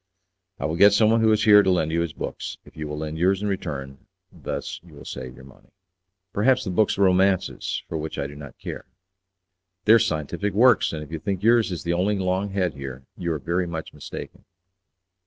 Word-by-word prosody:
"I - - -4
will 80 +2 -1
get 100 +2 +7
someone 110 +2 +4
who 110 -1 +4
is 110 0 +2
here 105 -1 +8
to 95 - +1
lend 80 -4 +1
you 85 +1 +1
his 85 -2 -2
books, - - -5
if - - -17
you 75 -1 -5
will 75 0 -5
lend 80 +1 -4
yours 95 +3 +2
in - - 0
return; 70 -9 -4 0.3
thus - - -5
you 85 -4 -16
will 70 - -12
save 65 -1 -7
your - - -14
money." 65 0 -18 0.6
"Perhaps 130 +5 +3
the 95 - -3
books 105 +3 +2
are 100 - +3
romances, 95 0 +1
for 80 - -4
which 80 +1 -5
I - - -2
do 70 - -7
not 75 -1 -11
care." - - -7 1.0
"They 110 - +7
are 115 - +7
scientific 85 +4 -1
works; 120 +2 +5
and 75 -1 -5
if 75 - -13
you 80 - -4
think 100 +1 -3
yours 115 -2 +4
is 85 -4 -4
the 85 - 0
only 100 +4 +1
long 95 +1 -1
head 95 -3 -1
here, 70 -1 -8
you 85 -1 -3
are 80 - -1
very 85 +5 -1
much 80 -2 -6
mistaken." - - -9
90 Hz, 220 wpm, -24 LUFS, 75-100 Hz, 1.0 s, here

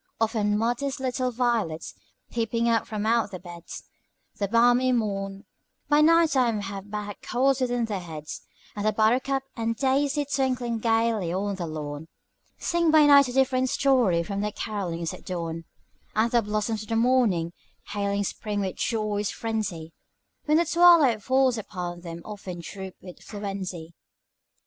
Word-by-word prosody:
Often 215 -2 +1
modest 245 +5 -1
little 255 -1 -1
violets, 225 - -1 0.4
peeping 230 0 0
up 230 -1 +2
from 215 -1 -3
out 230 -1 +2
their 185 -2 -7
beds 175 -1 -9 0.5
In 220 - -28
the 200 - 0
balmy 245 +4 +4
morn 200 -4 -2 0.4
by 295 0 +5
night 330 +1 +5
time 240 -6 +2
have 195 0 -7
bad 205 -1 -5
colds 265 +2 +1
within 245 -2 +1
their 210 -3 -3
heads; 155 -4 -7 0.3
And 205 - -3
the 215 0 +2
buttercup 255 +5 +2
and 230 -1 -1
daisy 280 +3 +1
twinkling 255 -4 -1
gayly 225 -5 +1
on 200 +3 -1
the 180 -3 -4
lawn, 150 0 -6 0.5
Sing 340 -1 +1
by 310 -1 +6
night 280 -2 +7
a - - -4
different 260 0 +2
story 245 -13 +3
from 200 +3 -3
their 210 0 -2
carollings 175 -6 -3
at - - -11
dawn; 165 -3 -4 0.5
And 225 +2 +2
the 240 -1 +4
blossoms 215 +1 -2
of 215 - -10
the 225 - 0
morning, 225 -9 +2 0.4
hailing 200 -1 -1
spring 205 +1 -3
with 190 -2 -3
joyous 210 -3 -1
frenzy, 215 -8 -4 0.5
When 305 +1 +4
the 340 - +3
twilight 335 -10 +5
falls 260 +1 +2
upon 180 -4 -6
them 170 -1 -8
often 195 -4 -7
droop 190 +2 -8
with 180 -1 -10
influenzy. 190 -5 -6
220 Hz, 160 wpm, -26 LUFS, 195-255 Hz, 0.5 s, night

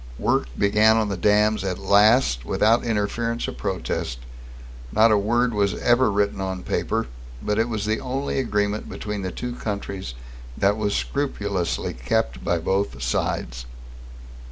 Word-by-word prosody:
Work - - +1
began 105 +2 +4
on 110 -2 +1
the 100 - -1
dams 105 +3 +2
at 95 -2 -2
last, 100 - +4
without 110 - +2
interference 115 +1 -1
or - - -3
protest. 95 -10 -3 0.7
Not 110 +1 +5
a - - +5
word 120 +4 +1
was 100 -1 +1
ever 120 -1 +3
written 100 -1 0
on 95 -1 -3
paper, - - -1 0.3
but 105 - -1
it 115 +1 +1
was 110 -3 -2
the 110 +1 0
only 135 +2 -2
agreement 105 -4 -1
between 105 -1 -5
the 95 - -3
two 125 0 -5
countries 100 - -5 0.4
that 100 +1 +3
was 105 -1 -1
scrupulously 100 - -2
kept 60 0 -1
by 85 - +1
both 95 -4 -1
sides. - - -2
105 Hz, 150 wpm, -23 LUFS, 95-110 Hz, 0.7 s, Not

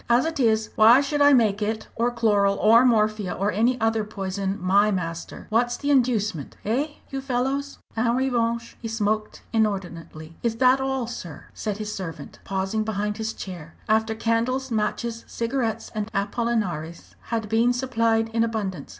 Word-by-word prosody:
"As 240 +4 +4
it 325 -2 -3
is, 220 -3 +2
why 225 +4 +7
should 290 +1 -1
I 285 0 +7
make 220 -6 +3
it, 220 +1 -2
or 235 +2 +1
chloral, 205 -4 +2
or 230 +3 +6
morphia, 215 -5 +2
or 200 +2 0
any 235 +6 +1
other 225 -1 +1
poison, 195 -1 -3
my 200 +3 +3
master! 170 -4 -4
What's 240 +2 +2
the 290 0 -1
inducement 220 - +1
eh, 250 +8 +1 0.2
you 270 0 -3
fellows?" 270 +2 -2 0.2
En 235 +1 +1
revanche 235 -3 0
he 230 - -4
smoked 215 -1 -2
inordinately. 175 -7 -2
"Is 230 -1 0
that 255 +2 +4
all, 265 -2 -1
sir," 175 -10 -8
said 210 -2 -3
his 215 0 -4
servant, 165 -7 -7
pausing 195 +3 -1
behind 210 -1 -2
his 220 0 -2
chair, 175 -6 -9
after 220 0 +2
candles, 235 +4 0
matches, 230 +1 -2
cigarettes, 230 -1 -2
and 215 0 -3
Apollinaris 200 -6 -2
had 225 -2 -2
been 225 +3 +3
supplied 230 -3 +1
in 225 0 +1
abundance. 215 -5 -3
225 Hz, 160 wpm, -24 LUFS, 205-240 Hz, 0.2 s, why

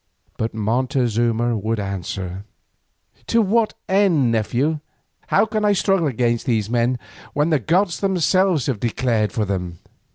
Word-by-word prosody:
But 110 0 -3
Montezuma 120 0 0
would 110 +1 -2
answer, 95 -1 -4 0.8
"To 230 - +3
what 220 +1 +2
end, 190 - +3
nephew? 125 +8 0 0.5
How - - +3
can 215 -1 -2
I 205 -1 +4
struggle 195 -3 +2
against 120 -1 0
these 110 -3 0
men 120 +1 +1 0.4
when 150 +3 +1
the 155 - +3
gods 175 - +1
themselves 185 - +2
have 130 -7 -1
declared 115 -2 0
for 110 -3 -1
them? 90 -3 -3
125 Hz, 135 wpm, -21 LUFS, 110-175 Hz, 0.8 s, I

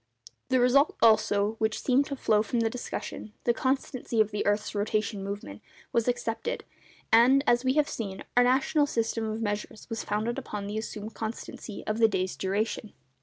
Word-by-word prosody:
The 260 -1 +3
result, 260 +4 +4
also, 215 -1 +3
which 220 -1 0
seemed 270 +2 +2
to 280 - -3
flow 215 -5 +2
from 230 +2 -1
the 225 -1 +1
discussion—the 235 -1 -4
constancy 260 -2 -1
of 215 -1 +3
the 210 - -1
earth's 205 +1 0
rotation 205 -1 -1
movement—was 200 - -5
accepted; 245 - -2 0.5
and, 250 +5 +6
as 240 -1 +3
we 260 0 +2
have 300 0 +3
seen, 195 -4 -5
our 245 - +6
national 270 +4 +3
system 230 -2 -1
of 220 +1 -3
measures 205 0 -4
was 225 - -3
founded 215 +3 -1
upon 205 -1 -5
the 210 +2 -3
assumed 215 0 -6
constancy 220 -1 -6
of 215 +1 -1
the 225 - +7
day's 190 -3 -1
duration. 205 +2 -2
225 Hz, 170 wpm, -28 LUFS, 210-245 Hz, 0.5 s, the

